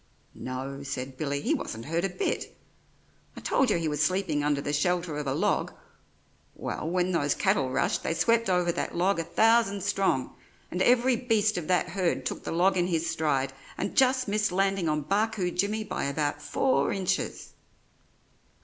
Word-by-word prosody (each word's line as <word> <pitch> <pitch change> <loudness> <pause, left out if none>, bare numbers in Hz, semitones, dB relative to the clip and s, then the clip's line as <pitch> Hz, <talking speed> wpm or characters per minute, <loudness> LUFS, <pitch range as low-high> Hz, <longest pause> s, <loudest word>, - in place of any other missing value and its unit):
"No," 135 +2 -6
said 135 -1 -5
Billy, 140 0 -2
"he - - +1
wasn't 115 +1 -4
hurt 165 +3 -1
a 195 - +1
bit. 180 - -3 0.8
I - - -4
told 270 - +1
you 205 - +2
he 165 -1 -1
was 150 -1 -1
sleeping 160 -3 +1
under 145 -1 +1
the 145 +1 -3
shelter 175 +1 0
of 150 -1 -4
a 135 - 0
log. - - 0 0.8
Well, 160 - -4
when 180 +1 +1
those 145 -5 +1
cattle 135 -2 +1
rushed 135 +2 0
they 165 - -1
swept 230 +3 +2
over 180 -1 +2
that - - -3
log 185 +1 +2
a - - 0
thousand 220 +2 +3
strong; 195 -10 0 0.4
and 180 - -2
every 250 +3 +4
beast 220 -3 +1
of 175 -3 -3
that 180 0 +2
herd 180 -1 -1
took - - -4
the - - -4
log 185 +3 +3
in 175 0 +2
his 170 -2 0
stride 150 -5 0 0.2
and - - -3
just 260 -1 +3
missed 210 -1 +1
landing 195 -2 +1
on 150 0 0
Barcoo 200 +1 0
Jimmy 205 +5 0
by 215 - -3
about 145 +1 -1
four 265 - +1
inches." 190 0 -2
175 Hz, 180 wpm, -28 LUFS, 150-200 Hz, 0.8 s, every